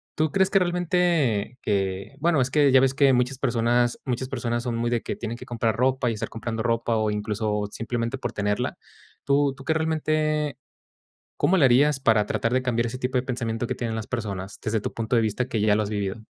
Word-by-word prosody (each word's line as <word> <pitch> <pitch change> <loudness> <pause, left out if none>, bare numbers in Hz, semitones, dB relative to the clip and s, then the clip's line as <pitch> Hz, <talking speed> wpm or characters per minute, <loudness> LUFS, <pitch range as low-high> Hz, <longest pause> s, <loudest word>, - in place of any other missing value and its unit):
¿tú 155 0 +1
crees 190 -1 +2
que 195 - +5
realmente 175 - +1
que? 95 +3 -2
Bueno, 160 0 +2
es 130 0 +1
que 145 -1 +4
ya 130 - +7
ves 130 0 +3
que 140 0 +4
muchas 125 +1 0
persona 120 -1 +2 0.2
muchas 130 0 -2
personas 120 -2 -2
son 120 -2 -2
muy 120 +1 0
de 120 -1 +1
que - - -4
tienen 115 0 -5
que - - -10
comprar 115 -2 -1
ropa 130 +1 +1
y - - -1
estar 105 - -4
comprando 115 0 -4
ropa, 115 -1 0
o 110 -1 +1
incluso, 105 0 -2
simplemente 115 +3 -3
por 120 -3 -4
tenerla. 105 -1 -1 0.5
¿Tú 140 0 +2
tú 135 - -11
qué 160 - +2
realmente 155 -2 0 0.8
cómo 190 - +3
le 150 - +5
harías 135 +3 +4
para 110 -5 +3
tratar 115 +1 -1
de 130 - +2
cambiar 120 -2 0
ese 120 +2 -5
tipo 130 0 -1
de 125 - +1
pensamiento 120 -3 -2
que - - -2
tienen 115 -2 -3
las 110 -1 -4
personas? 100 -5 -5
Desde 110 0 0
tu - - -4
punto 115 +2 -1
de 115 - +3
vista, 110 +4 -1
que 115 - -2
ya 105 0 +3
lo 110 - +1
has 100 - -4
vivido. 105 +1 -3
120 Hz, 225 wpm, -25 LUFS, 110-135 Hz, 0.8 s, ya